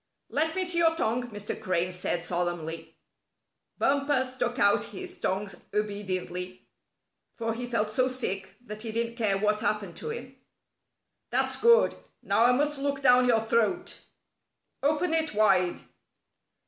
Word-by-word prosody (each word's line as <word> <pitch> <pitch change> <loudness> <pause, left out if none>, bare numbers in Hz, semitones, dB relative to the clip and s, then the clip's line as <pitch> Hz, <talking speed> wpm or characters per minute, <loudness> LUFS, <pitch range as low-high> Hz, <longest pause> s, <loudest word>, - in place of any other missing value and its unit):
"Let 320 +2 0
me 375 -1 +3
see 350 -1 +1
your 325 -1 +4
tongue," 245 -4 -1
Mr. 205 -2 -5
Crane 180 0 0
said 175 -1 -2
solemnly. 165 -2 -3 0.8
Bumper 275 -1 +2
stuck 255 -1 -3
out 205 -5 +3
his 370 0 -9
tongue 195 +1 -1 0.2
obediently, 185 -3 -3 0.7
for 225 -1 -2
he 245 +2 -5
felt 220 -3 0
so 255 +4 +2
sick 200 -7 -3
that 215 -2 -7
he 225 -1 -4
didn't 235 +1 -2
care 215 -5 +1
what 210 +1 +1
happened 210 -5 -1
to - - -4
him. 460 - -7 0.9
"That's - - +1
good! 470 +1 +5 0.3
Now 230 - +3
I 245 - +6
must 290 +3 +1
look 280 0 -2
down 250 -1 +6
your 230 -2 +4
throat. 235 +11 0 0.8
Open 310 +4 +1
it 320 -7 0
wide." 190 -4 +3
230 Hz, 145 wpm, -28 LUFS, 195-275 Hz, 0.9 s, I